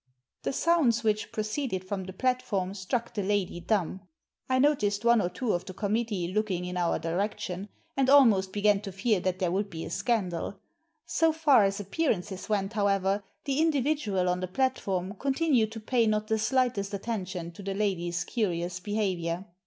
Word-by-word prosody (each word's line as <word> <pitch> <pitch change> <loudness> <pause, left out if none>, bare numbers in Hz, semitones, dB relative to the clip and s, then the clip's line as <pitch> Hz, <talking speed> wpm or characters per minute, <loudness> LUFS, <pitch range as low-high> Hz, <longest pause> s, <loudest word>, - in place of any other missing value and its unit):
The - - -1
sounds 275 -7 +2
which 215 -1 0
proceeded 215 -2 -2
from 190 -1 -3
the 190 - -6
platform 210 -4 -1
struck 230 +5 -3
the 210 - -1
lady 195 -3 0
dumb. 185 0 -1 0.5
I 260 - +3
noticed 230 -7 +2
one 235 -2 +5
or 175 - 0
two 235 +4 -1
of 175 - -1
the 185 - -8
committee 210 -3 -1
looking 195 -4 0
in 180 0 -5
our 175 -2 +1
direction, 185 +3 -3 0.3
and 270 -1 +2
almost 225 -9 +6
b^an 205 0 +2
to 200 -2 -6
fear 195 +2 +1
that 185 0 -1
there 185 -3 0
would 200 +2 -1
be 165 -3 -6
a - - -7
scandal 195 -9 -1 0.5
So 325 -1 +2
far 300 -9 +5
as 195 +1 -1
appearances 200 - -2
went, 200 0 0
however, 200 -1 +1 0.2
the 275 0 0
individual 285 - +1
on 180 0 +1
the 185 - -3
platform 195 -4 -1
continued 270 -5 +2
to 225 - -6
pay 230 +1 +1
not 215 0 0
the 220 0 +2
slightest 220 -4 +1
attention 190 -5 -4
to 170 - -11
the 195 0 -3
lady's 175 -4 -1
curious 180 -5 -2
behaviour. 185 -3 -2
205 Hz, 175 wpm, -28 LUFS, 185-235 Hz, 0.5 s, almost